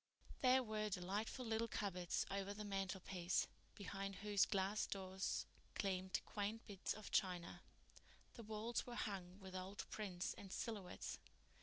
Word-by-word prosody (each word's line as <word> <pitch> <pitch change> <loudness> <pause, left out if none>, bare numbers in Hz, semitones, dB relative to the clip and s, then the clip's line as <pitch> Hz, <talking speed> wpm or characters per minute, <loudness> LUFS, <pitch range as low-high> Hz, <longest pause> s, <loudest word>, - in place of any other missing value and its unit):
There 260 0 +7
were 215 -2 0
delightful 205 +6 0
little 225 0 +2
cupboards 180 -5 +1
over 200 +1 0
the 210 0 -3
mantelpiece, 190 -2 +1 0.3
behind 195 0 -2
whose 205 -1 +4
glass 200 +1 +2
doors 190 -1 0 0.3
gleamed 190 -2 +1
quaint 210 +2 -1
bits 200 -3 -1
of 215 0 -7
china. 175 -2 +2 0.7
The 235 - -7
walls 220 +2 0
were 240 - -3
hung 190 -5 -2
with 190 -1 -7
old 190 +2 -3
prints 190 -4 -1
and 195 - -8
silhouettes. 205 -5 -2
200 Hz, 135 wpm, -44 LUFS, 185-215 Hz, 0.7 s, There